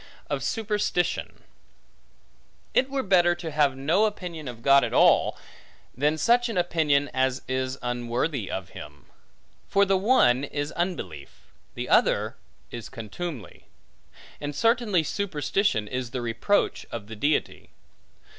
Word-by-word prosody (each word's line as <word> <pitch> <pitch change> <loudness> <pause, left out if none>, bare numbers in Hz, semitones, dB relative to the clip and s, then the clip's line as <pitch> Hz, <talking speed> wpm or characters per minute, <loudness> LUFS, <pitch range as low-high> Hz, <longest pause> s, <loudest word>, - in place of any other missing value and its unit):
Of - - -1
Superstition 210 -5 -1 1.3
IT 260 - +2
WERE 270 -1 -1
better 175 -3 +4
to 170 -2 -6
have 145 -3 +2
no 165 +10 +2
opinion 175 -8 -5
of 115 -2 -8
God 140 0 +6
at - - -2
all, - - +4 0.6
than 150 +5 +1
such 240 +6 +3
an 220 - -3
opinion, 155 -5 +2
as 130 0 0
is 130 0 -2
unworthy 120 - -2
of 95 -3 -5
him. - - -11 0.6
For 200 0 +3
the 195 0 +2
one 165 - +4
is 145 +1 -3
unbelief, 80 - -5 0.2
the - - -4
other - - +2 0.4
is 120 -2 -7
contumely; 115 - -7 0.7
and 145 0 -5
certainly 225 - +2
superstition 175 - -1
is 125 +1 -4
the 125 0 -4
reproach 120 - 0
of 115 -3 -5
the 110 +1 -9
Deity. 145 +8 -1
145 Hz, 130 wpm, -26 LUFS, 125-190 Hz, 1.3 s, God